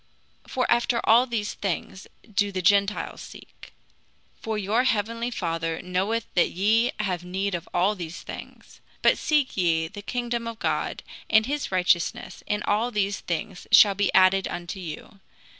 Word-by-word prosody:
(For 255 Hz, -, -1 dB
after 235 Hz, 0 st, +2 dB
all 240 Hz, +3 st, +5 dB
these 220 Hz, -4 st, -2 dB
things 190 Hz, 0 st, -4 dB, 0.3 s
do 205 Hz, 0 st, +1 dB
the 185 Hz, -1 st, -3 dB
Gentiles 200 Hz, +2 st, +2 dB
seek), -, -, -13 dB, 0.7 s
for 220 Hz, -1 st, -3 dB
your 210 Hz, +4 st, +1 dB
heavenly 230 Hz, 0 st, 0 dB
Father 165 Hz, -6 st, -2 dB
knoweth 195 Hz, +5 st, -1 dB
that 175 Hz, -, +3 dB
ye 220 Hz, +6 st, +2 dB
have 185 Hz, -4 st, -2 dB
need 190 Hz, +2 st, -2 dB
of 175 Hz, 0 st, -5 dB
all 185 Hz, +4 st, +2 dB
these 175 Hz, -4 st, -7 dB
things. -, -, -11 dB, 0.2 s
But -, -, +4 dB
seek 300 Hz, -4 st, +1 dB
ye 165 Hz, -3 st, +1 dB
first 160 Hz, -, -10 dB
the 205 Hz, -, -7 dB
kingdom 240 Hz, +1 st, -3 dB
of 230 Hz, -1 st, -6 dB
God, -, -, -2 dB, 0.3 s
and 220 Hz, -1 st, +5 dB
his 285 Hz, -1 st, -3 dB
righteousness, 180 Hz, -2 st, 0 dB
and 210 Hz, 0 st, -1 dB
all 220 Hz, +4 st, +1 dB
these 205 Hz, -3 st, -1 dB
things 175 Hz, +2 st, -5 dB
shall 205 Hz, -2 st, +8 dB
be 205 Hz, +1 st, 0 dB
added 190 Hz, 0 st, +5 dB
unto 175 Hz, +2 st, -6 dB
you. 175 Hz, +3 st, -8 dB
200 Hz, 160 wpm, -25 LUFS, 180-225 Hz, 0.7 s, shall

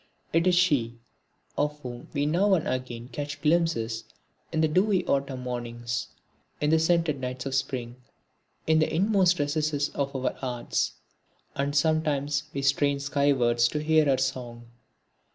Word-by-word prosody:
It 165 Hz, +2 st, +3 dB
is 180 Hz, -, +4 dB
she, 140 Hz, -10 st, +2 dB, 0.6 s
of 150 Hz, 0 st, 0 dB
whom 120 Hz, -2 st, -8 dB
we 145 Hz, -1 st, 0 dB
now 190 Hz, +6 st, +3 dB
and 165 Hz, -, -1 dB
again 125 Hz, -2 st, -4 dB
catch 145 Hz, +3 st, -5 dB
glimpses 150 Hz, -9 st, +1 dB, 0.5 s
in 160 Hz, -1 st, 0 dB
the 160 Hz, -, +4 dB
dewy 185 Hz, +4 st, +2 dB
Autumn 135 Hz, -2 st, -1 dB
mornings, 120 Hz, -1 st, -4 dB, 0.5 s
in 150 Hz, +1 st, +1 dB
the 160 Hz, -, +5 dB
scented 160 Hz, -3 st, +2 dB
nights 125 Hz, 0 st, -4 dB
of 135 Hz, -, -3 dB
Spring, 130 Hz, -3 st, -2 dB, 0.7 s
in 160 Hz, 0 st, +4 dB
the 155 Hz, -, +1 dB
inmost 185 Hz, 0 st, +3 dB
recesses 145 Hz, -1 st, 0 dB
of 140 Hz, -1 st, -3 dB
our 130 Hz, -1 st, -1 dB
hearts 125 Hz, -2 st, -2 dB, 0.6 s
and 140 Hz, +1 st, -2 dB
sometimes 150 Hz, -2 st, +1 dB
we 140 Hz, -1 st, -4 dB
strain 140 Hz, 0 st, +2 dB
skywards 135 Hz, -4 st, +2 dB
to 150 Hz, -, -3 dB
hear 155 Hz, 0 st, +4 dB
her 135 Hz, -2 st, +3 dB
song. 120 Hz, -3 st, -4 dB
140 Hz, 150 wpm, -27 LUFS, 125-155 Hz, 0.7 s, the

